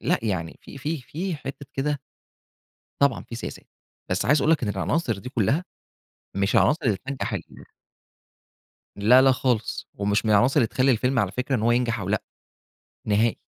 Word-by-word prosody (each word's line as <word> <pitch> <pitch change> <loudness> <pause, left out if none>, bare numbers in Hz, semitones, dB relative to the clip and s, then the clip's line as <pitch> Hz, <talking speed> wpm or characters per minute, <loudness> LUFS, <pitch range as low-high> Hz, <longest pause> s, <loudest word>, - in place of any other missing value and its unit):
لأ 180 - +1
يعني 90 -7 -3
في - - -11
في 150 +2 -3
في 170 +7 -4
حتّة 140 0 -8
كده 145 +1 -1 1.0
طبعًا 140 -4 +3
في 115 - -8
سياسات، 115 - -7 0.5
بس 95 +2 0
عايز 145 +6 +4
أقول 155 - +3
لك 160 - +2
إن 105 - 0
العناصر 105 - -1
دي 110 +6 -8
كلّها، 130 - +1 0.7
مش 100 +1 +1
العناصر 150 - +4
اللي 110 -5 +2
تنجَّح 140 -1 -3
ال - - -3 1.5
لا، 110 +6 +6
لا 135 0 +6
خالص، 125 -4 -1
ومش 100 +2 0
من 110 - +2
العناصر 120 +6 +4
اللي 115 - +3
تخلّي 130 +4 +2
الفيلم 125 +3 +1
على - - +1
فكرة 130 +2 -1
إن 115 - -1
هو 115 +2 +3
ينجح 120 -2 +1
أو 95 -1 -4
لأ، 105 0 0 0.8
نهائي 110 +2 +2
125 Hz, 175 wpm, -25 LUFS, 105-140 Hz, 1.5 s, لا